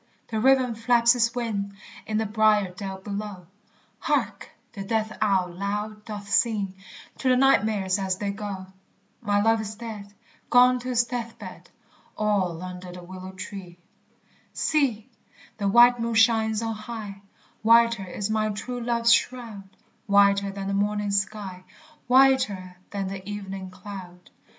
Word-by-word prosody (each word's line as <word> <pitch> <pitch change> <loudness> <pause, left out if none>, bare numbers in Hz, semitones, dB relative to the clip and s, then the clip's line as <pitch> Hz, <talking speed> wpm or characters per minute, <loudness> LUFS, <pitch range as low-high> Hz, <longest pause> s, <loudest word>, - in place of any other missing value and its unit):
the 220 -1 -2
raven 260 0 +4
flaps 235 +1 +4
his 235 -1 +1
wing 200 -5 -3 0.3
In 215 - -1
the 220 - 0
briered 210 -3 +2
dell 195 -1 -5
below; 200 -1 -6 0.5
Hark! - - -1 0.2
the 195 - -6
death 220 +1 -1
owl 190 -4 +2
loud 210 +3 -4
doth 205 -2 -7
sing 205 -2 +1 0.5
To 260 - +1
the 255 - +4
nightmares 210 -7 +3
as 190 -1 -1
they 200 0 -2
go. 200 -2 -6 0.6
My 205 -3 +1
love 225 +1 +3
is 215 0 -6
dead, 215 -3 -8 0.4
etc. 245 -1 +1 2.9
See! 260 -7 0 0.5
the 200 - 0
white 240 +4 +6
moon 230 0 -1
shines 225 -1 +3
on 225 0 -2
high; 215 -2 -7 0.4
Whiter 230 -3 +4
is 200 +3 -3
my 215 0 +1
true 245 +4 -5
love's 235 -1 +3
shroud, 230 -5 -2 0.4
Whiter 200 0 +4
than 195 0 -5
the 200 - -1
morning 205 +1 0
sky, 200 -2 -2 0.4
Whiter 245 -9 +3
than 200 -1 -3
the 190 +1 -7
evening 195 -2 -6
cloud. 185 -2 -11
210 Hz, 125 wpm, -25 LUFS, 200-230 Hz, 2.9 s, white